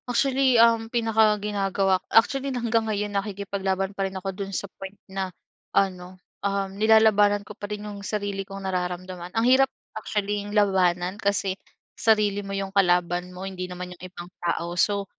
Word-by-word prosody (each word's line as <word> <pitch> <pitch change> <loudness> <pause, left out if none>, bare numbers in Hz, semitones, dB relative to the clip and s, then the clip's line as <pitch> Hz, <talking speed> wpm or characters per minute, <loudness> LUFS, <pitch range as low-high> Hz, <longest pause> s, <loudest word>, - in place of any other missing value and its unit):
Actually, 265 0 +3
ang 230 -1 +5
pinakaginagawa 210 -4 +2
actually 270 +4 +3
hanggang 230 -3 0
ngayon, 205 -1 -2
nakikipaglaban 195 -1 -2
pa 195 -1 -1
rin 190 - -7
ako 190 +1 -4
do'n 195 +1 -5
sa 195 - -3 0.2
point 195 +1 -7
na 190 -1 -4 0.5
ano, 185 -1 0 0.2
um, 200 -1 -1
nilalabanan 210 -1 +4
ko 210 - -9
pa 205 0 -8
rin 210 0 -5
'yung 205 -1 -7
sarili 200 -1 -3
kong 195 0 -8
nararamdaman. 180 -1 -3
Ang 225 - +3
hirap 260 +2 +5 0.2
actually'ng 205 -1 -2
labanan 185 -1 +2
kasi 200 -1 +1 0.4
sarili 210 -2 +2
mo 195 - -9
'yung 195 0 -4
kalaban 180 -2 +2
mo, 180 +1 -8
hindi 185 -1 -5
naman 180 0 -6
'yung 175 - -18
ibang 175 -1 -10
tao. 170 0 -1
So 200 +3 +1
200 Hz, 160 wpm, -25 LUFS, 190-210 Hz, 0.5 s, ang